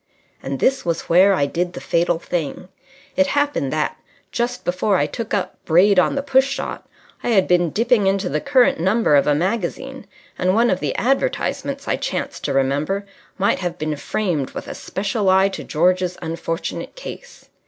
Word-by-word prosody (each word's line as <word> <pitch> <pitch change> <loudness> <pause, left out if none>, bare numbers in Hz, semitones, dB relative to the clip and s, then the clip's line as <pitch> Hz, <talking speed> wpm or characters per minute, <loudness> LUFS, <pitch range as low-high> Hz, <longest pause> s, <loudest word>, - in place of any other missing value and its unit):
And 135 0 -4
this 270 0 +2
was 170 -1 -1
where 190 +4 +5
I 140 - +2
did 175 +5 -2
the - - -6
fatal 170 0 +1
thing. 170 0 -4 0.5
It 280 - +3
happened 285 - 0
that, 155 -1 -1 0.3
just 240 +4 -2
before 185 +3 +1
I 145 - +2
took 220 +9 -6
up 200 -3 -2
"Braid 185 +4 +5
on 180 - +2
the 275 - -1
Push 270 -1 +3
Shot," 275 - -5 0.3
I - - -1
had 195 -5 +3
been 175 -1 +3
dipping 225 - +2
into 195 0 +1
the - - -1
current 270 - +3
number 190 -1 +3
of 140 - +4
a 145 - +4
magazine, 210 - -3 0.3
and 185 +1 +2
one 235 +1 +3
of 185 - 0
the - - -2
advertisements, 275 - -1
I - - +1
chanced - - -4
to 145 - -1
remember, 145 +9 0 0.3
might 200 0 +1
have 175 -2 -3
been 155 -1 -2
framed 155 -2 -2
with - - -6
a - - -5
special 200 +1 -2
eye 190 +1 +4
to 195 - -6
George's 180 +2 +1
unfortunate 165 +1 -4
case. - - -10
185 Hz, 185 wpm, -21 LUFS, 165-230 Hz, 0.5 s, where